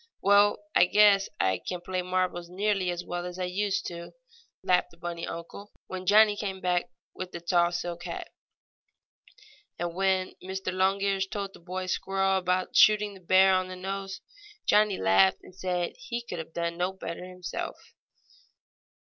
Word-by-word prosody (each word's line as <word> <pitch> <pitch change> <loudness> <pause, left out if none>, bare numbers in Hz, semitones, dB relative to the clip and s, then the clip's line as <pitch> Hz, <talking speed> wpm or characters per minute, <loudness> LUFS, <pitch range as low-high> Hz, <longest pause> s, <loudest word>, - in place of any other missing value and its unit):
"Well, 200 +1 +5 0.2
I - - +6
guess 200 0 +5
I 95 -1 +2
can 180 - -5
play 185 +1 -3
marbles 180 -1 -1
nearly 195 0 0
as 175 0 -3
well 175 0 -4
as 180 0 -6
I 185 - -2
used 195 +2 -1
to," 170 -1 -7 0.5
laughed 180 0 +2
the 170 - -20
bunny 170 0 -5
uncle 170 +5 -8
when 185 0 -7
Johnnie 210 +1 +6
came 195 -2 -4
back 180 -1 0 0.2
with 185 -1 -6
the 170 - -6
tall 175 0 +2
silk 175 0 -4
hat. - - -6 1.5
And 175 -1 -3
when 190 0 +1
Mr. 190 0 -4
Longears 195 +1 +1
told 200 -1 -5
the - - -14
boy 185 +2 -5
squirrel 195 +1 0
about 185 0 -1
shooting 210 -1 +5
the 195 - -13
bear 185 +2 +5
on 185 0 +1
the 185 - -7
nose, 195 +1 -5 0.4
Johnnie 210 -1 +4
laughed 95 0 +3
and - - -14
said 180 -2 -2
he 240 -2 -5
could 180 -8 -6
have 160 0 -8
done 170 0 -2
no 180 +2 -1
better 175 -2 -6
himself. 180 -1 -7
185 Hz, 165 wpm, -28 LUFS, 175-195 Hz, 1.5 s, I